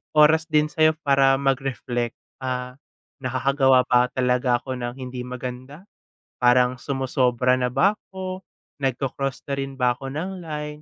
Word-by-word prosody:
oras 155 +2 +5
din 150 -1 +2
sa'yo 155 0 +3
para 135 -1 +4
mag-reflect, 130 -3 -1 0.2
ah, 125 0 -4 0.4
"Nakakagawa 130 0 +3
pa 125 0 +3
talaga 125 -1 +2
ako 130 -2 -5
ng 120 0 -4
hindi 125 -1 -6
maganda? 125 +5 -7 0.6
Parang 125 0 +4
sumosobra 130 -2 +1
na 125 - +1
ba 185 +12 +2
ako? 185 -1 -7 0.4
Nagko-cross 135 0 -2
na - - +1
rin 135 0 -4
ba 125 -2 +2
ako 130 +2 -6
ng 155 +7 -4
line?" 150 -2 -6
130 Hz, 140 wpm, -23 LUFS, 125-145 Hz, 0.6 s, oras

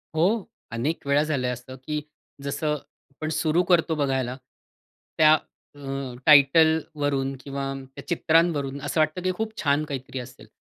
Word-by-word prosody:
हो, 190 +6 +2 0.3
अनेक 140 +9 -2
वेळा 140 +2 +4
झालंय 135 -5 -1
असं, 125 +1 -8
की 150 +4 -4 0.4
जसं 150 +2 -1
आपण 150 +1 -9
सुरु 160 +2 +2
करतो 165 -2 +3
बघायला 130 -3 0 0.8
त्या 155 0 +7 0.4
अ, 135 -2 -5
टायटलवरून 145 -2 +4
किंवा 135 0 -4 0.2
त्या 140 - -9
चित्रांवरून 160 -5 +2
असं 160 - -2
वाटतं 155 +4 +1
की 185 - +1
खूप 220 0 -2
छान 145 0 +2
काहीतरी 135 -2 -5
असेल, 125 -3 -11
145 Hz, 135 wpm, -25 LUFS, 135-160 Hz, 0.8 s, त्या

